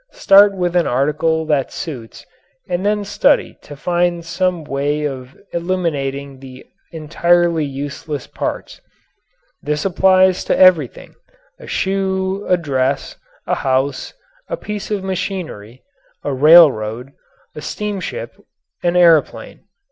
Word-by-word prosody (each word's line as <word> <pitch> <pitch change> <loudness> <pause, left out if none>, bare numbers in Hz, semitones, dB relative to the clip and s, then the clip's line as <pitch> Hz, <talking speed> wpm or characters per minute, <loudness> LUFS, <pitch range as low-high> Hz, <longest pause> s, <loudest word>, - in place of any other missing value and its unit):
Start 200 0 +5
with 180 -1 -1
an 175 - +2
article 150 +5 0
that 145 -4 0
suits 125 -9 -8 0.4
and 180 +1 -2
then 210 0 0
study 205 +1 +1
to 145 - -11
find 175 +2 -1
some 180 -1 -1
way 145 +1 -2
of 130 -2 -6 0.2
eliminating 140 -6 -3
the 130 -1 -12 0.3
entirely 170 0 +1
useless 140 +1 -6
parts. - - -6 0.8
This 150 +2 -2
applies 185 0 +3
to - - 0
everything 175 -8 +3 0.5
a - - -12
shoe, 190 0 -2
a 180 - +4
dress, 135 -4 -2 0.3
a - - -1
house, 135 +1 -1 0.3
a - - -3
piece 210 - -6
of 205 -3 -2
machinery, 180 - -5 0.4
a 145 - -2
railroad, 135 -5 +5 0.4
a 150 - -8
steamship, 210 - -5 0.5
an 175 0 0
airplane. 170 -4 +2
165 Hz, 115 wpm, -18 LUFS, 140-185 Hz, 0.8 s, Start